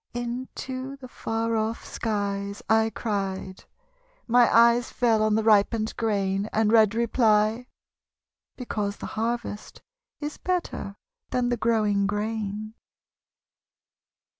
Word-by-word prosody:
Into 255 +2 -5
the 265 -2 -10
far 225 -1 -2
off 220 +1 -2
skies 200 -2 -3
I 220 0 +3
cried. 195 -4 -4 0.6
My 240 0 +5
eyes 235 +1 +5
fell 230 -3 +2
on 215 0 +2
the 220 - +1
ripened 215 +1 +3
grain, 200 -2 0
And 220 -1 +2
read 220 -2 +5
reply: 225 0 +2 0.9
because 210 -5 -3
the - - -7
harvest 225 -1 -4 0.4
Is 295 0 -5
better 355 - -3 0.3
than 245 -1 0
the 245 - +1
growing 210 -4 +2
grain. 210 0 -3
220 Hz, 110 wpm, -26 LUFS, 210-235 Hz, 0.9 s, My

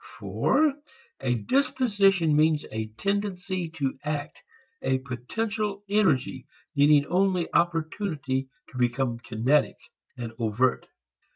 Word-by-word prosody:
For 305 -2 +2 0.5
a 125 -2 0
disposition 200 - +2
means 155 0 +3
a 110 0 -3
tendency 195 - -2
to 135 -4 -2
act, 150 -1 -4 0.4
a 130 0 +1
potential 200 - -3
energy 160 -11 +1 0.3
needing 145 0 +5
only 180 0 +1
opportunity 160 -5 0 0.2
to 125 - -7
become 120 -1 0
kinetic 120 +6 +1 0.4
and 120 -2 -5
overt. 115 +3 +1
150 Hz, 100 wpm, -26 LUFS, 130-195 Hz, 0.5 s, needing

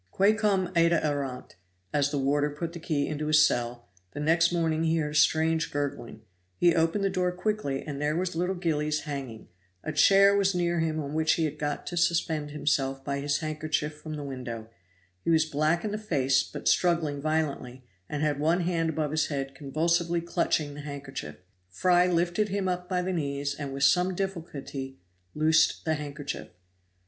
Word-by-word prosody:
Quae 200 - +3
cum 195 -4 0
ita 170 0 +4
erant, 140 -4 -3 0.4
as 145 -1 +2
the 145 - -2
warder 145 +2 +1
put 165 +3 -5
the 170 - -7
key 150 -3 -1
into 150 0 -3
his 150 0 +6
cell 120 -2 -2 0.3
the - - -6
next 165 +3 +3
morning 165 -2 0
he 165 0 +2
heard 150 -2 -1
a - - -7
strange 160 +1 +3
gurgling; 140 -5 -4 0.4
he 175 -1 +4
opened 165 +4 +1
the 195 - +2
door 180 -1 0
quickly, 180 -7 -2
and 145 -2 -5
there 150 +1 0
was 180 0 -2
little 180 +3 0
Gillies 150 -4 -1
hanging; 135 -7 -6 0.4
a - - -3
chair 195 +6 +6
was 195 -1 +2
near 175 -1 +1
him 160 -1 0
on 145 -1 -4
which 160 +1 +2
he 165 - +1
had 150 - -4
got 145 0 -3
to 175 - -5
suspend 160 -3 +1
himself 135 -2 -1
by 140 -1 -2
his 145 +2 -1
handkerchief 155 -1 -2
from 155 -1 -6
the 150 - -5
window; 120 -5 -6 0.5
he - - -1
was 160 -1 +4
black 155 +4 0
in 210 - -2
the 210 - -3
face, 140 -11 +2
but - - -6
struggling 165 -5 +2
violently, 140 -5 -2 0.3
and 150 0 -2
had 150 -2 0
one 165 +4 +2
hand 170 -2 0
above 155 -2 -1
his 155 0 +1
head 135 -2 -3
convulsively 170 +4 0
clutching 155 -3 -1
the 145 - -8
handkerchief. 140 -2 -7 0.3
Fry 180 - +3
lifted 175 +4 +1
him 195 -1 -1
up 180 0 -2
by 180 -1 0
the 185 +1 -2
knees 140 -3 -2
and 140 -1 -6
with 135 0 -3
some 180 +6 +3
difficulty 150 -8 -5 0.4
loosed 155 +1 +3
the 160 - +2
handkerchief. 145 -1 -5
155 Hz, 190 wpm, -28 LUFS, 145-170 Hz, 0.5 s, his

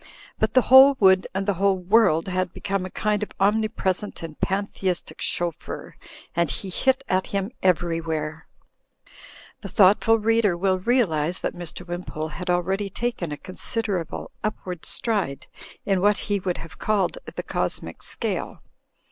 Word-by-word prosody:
But - - 0
the 255 - +6
whole 265 +1 +8
wood 190 -2 +5
and 195 +1 -2
the 200 - +2
whole 200 -1 +4
world 185 -3 +3
had 185 -1 -2
become 195 -2 -2
a - - -5
kind 210 +2 -1
of 210 - -4
omnipresent 205 -2 0
and 160 -2 -7
panthe 200 +2 -2
istic 185 -2 -1
chauffeur, 175 -2 -3 0.4
and 170 -1 +2
he 195 - -5
hit 265 +7 +1
at 185 0 +1
him 200 +2 -2
everywhere. 165 -3 -1 1.1
The - - -7
thoughtful 210 +3 +5
reader 220 -4 +2
will 185 +1 +1
realise 180 - +1
that - - -2
Mr. 175 0 -8
Wim 175 0 -5
pole 155 +1 -4
had 180 +4 -6
already 190 +3 0
taken 195 -6 -3
a 145 - -4
considerable 190 -1 -3
upward 185 -5 -4
stride 205 -12 -1 0.4
in 195 -2 +1
what 205 +1 +4
he 205 -1 -1
would 180 -1 -2
have 165 - -10
called 215 - 0 0.2
the - - -4
cosmic - - -2
scale. - - -4
190 Hz, 155 wpm, -24 LUFS, 175-210 Hz, 1.1 s, whole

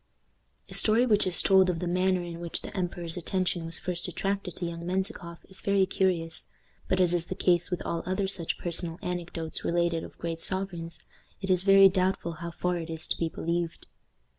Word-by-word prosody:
The - - -11
story 225 +3 +4
which 210 -5 +3
is 180 - +2
told 190 -1 +5
of 175 - 0
the 180 - -3
manner 185 +1 +1
in 170 -1 -7
which 170 -1 -5
the - - -8
emperor's 175 -2 0
attention 180 -1 -1
was 165 - +2
first 175 0 -2
attracted 195 +1 -2
to 175 - -4
young 170 0 -5
Menzikoff 180 -1 -3
is 190 - -8
very 200 -1 +3
curious, 180 -4 0 0.4
but, 185 - +1
as 180 -2 +3
is 170 -1 -1
the 185 - -4
case 175 -1 +2
with 180 - -3
all 170 - -2
other 190 +1 0
such 175 -4 +1
personal 170 -1 -1
anecdotes 170 -2 -4
related 170 -1 +1
of - - -11
great 165 -1 -3
sovereigns, 170 -4 -2 0.4
it 190 -1 -2
is 180 -1 +6
very 195 0 +8
doubtful 185 -2 0
how 170 - -4
far 180 +1 -1
it 165 0 -6
is 160 -1 -4
to - - 0
be 165 - 0
believed. 170 +1 -3
175 Hz, 200 wpm, -28 LUFS, 170-190 Hz, 0.4 s, very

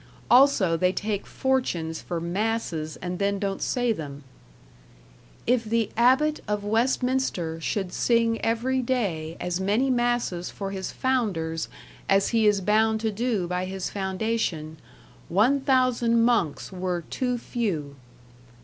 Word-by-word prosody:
Also 245 -9 +5
they 180 +2 +2
take 205 +1 -3
fortunes 180 - -1
for 175 - -4
masses 170 -3 -2
and 180 0 -3
then 200 0 +1
don't 195 -1 -3
say 245 -3 +1
them. 145 -6 -7 1.2
"If 245 -1 +2
the 225 0 0
Abbot 265 +6 +3
of 210 -1 -1
west 230 +5 +1
minster 220 -11 -1
shulde 190 +2 -2
sing 230 -1 +2
every 245 +3 +1
day 185 -11 -2
as 180 0 -2
many 220 +8 +2
masses 240 -8 0
for 195 -1 -5
his 190 -1 -4
founders 185 -11 -1 0.4
as 195 0 +4
he 225 -2 +3
is 205 -2 +3
bounde 220 +2 +2
to 220 -1 0
do 215 -4 -1
by 180 +1 -2
his 190 0 -4
foundacion, 190 -5 -2 0.5
1000 250 - +3
monkes 220 -12 +1
were 180 -1 -2
too 250 -1 -1
few." 190 - -3
210 Hz, 130 wpm, -26 LUFS, 180-240 Hz, 1.2 s, Also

